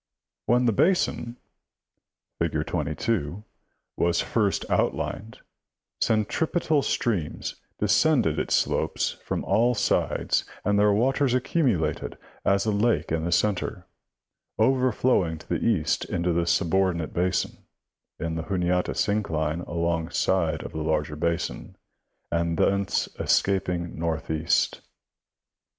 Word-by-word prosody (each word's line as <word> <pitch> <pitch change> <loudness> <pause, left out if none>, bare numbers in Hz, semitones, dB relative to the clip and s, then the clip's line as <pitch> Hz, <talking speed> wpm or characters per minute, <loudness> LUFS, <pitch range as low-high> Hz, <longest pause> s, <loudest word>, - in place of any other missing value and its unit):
When 125 +1 +3
the 115 - +4
basin, 125 - +1 1.0
BT, 85 -2 -1
fig. 75 - -1
22, 85 +3 -2 0.5
was 85 0 +2
first 105 -4 0
outlined, 110 +2 -1 0.6
centripetal 150 - +1
streams 100 - -2 0.2
descended - - +3
its - - +1
slopes - - 0
from - - -3
all 115 +5 +2
sides 100 - +1 0.2
and 105 0 +2
their 105 0 +5
waters 130 +4 +2
accumu 130 - +2
lated 80 -2 -3 0.3
as 100 +1 +2
a 110 - +1
lake 110 +3 +1
in 80 0 0
the 85 - -1
center, 95 0 0 0.7
overflowing 125 -9 +2
to - - -15
the - - -1
east - - +1
into 85 0 -1
the 85 0 0
subordinate 90 -2 +1
basin, 90 +1 -1 0.6
A, - - -5
in 80 - -2
the 80 - -2
Juniata 90 -1 0
syncline 85 -6 -1
along 85 -1 -1
side 80 -4 0
of - - -7
the 80 - -4
larger 75 -1 -1
basin, 85 +2 -2 0.6
and 85 -1 0
thence 100 +2 +1
escaping 90 -4 0
northeast. 80 0 0
90 Hz, 120 wpm, -26 LUFS, 80-110 Hz, 1.0 s, their